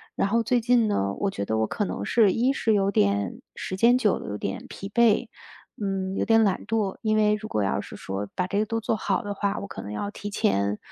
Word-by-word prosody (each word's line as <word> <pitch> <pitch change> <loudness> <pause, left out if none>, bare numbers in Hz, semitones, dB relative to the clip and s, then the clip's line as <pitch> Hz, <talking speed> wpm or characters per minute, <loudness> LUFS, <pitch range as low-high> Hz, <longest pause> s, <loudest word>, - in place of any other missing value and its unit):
然 - - +1
后 230 +3 +2
最 245 +2 +2
近 235 0 +3
呢， 100 - 0
我 195 - -1
觉 100 - -4
得 110 +2 -1
我 110 - +2
可 210 - -2
能 - - -4 0.3
一 240 +7 +2
是 230 -5 +1
有 200 -1 +2
点 100 - +1
时 185 - -5
间 235 +4 +5
久 215 -6 +2
了， - - -8
有 105 - -4
点 100 - -4
疲 195 - -8
惫， 235 -1 +3 0.5
嗯， 190 -1 -2
有 - - 0
点 225 0 +5
懒 195 -3 0
惰。 215 -3 -1
因 215 -1 +1
为 210 -1 +3
如 215 +1 -7
果 105 - -1
要 95 - 0
是 - - -8
说 95 +1 -5
把 180 - 0
这 200 +2 0
个 215 - +2
都 225 +1 -2
做 220 - 0
好 195 -2 -1
的 205 - -3
话， 200 0 -1
我 200 - -6
可 - - -7
能 105 - -7
要 200 - -3
提 205 - -6
前 105 - +1
200 Hz, 270 characters per minute, -25 LUFS, 180-220 Hz, 0.5 s, 间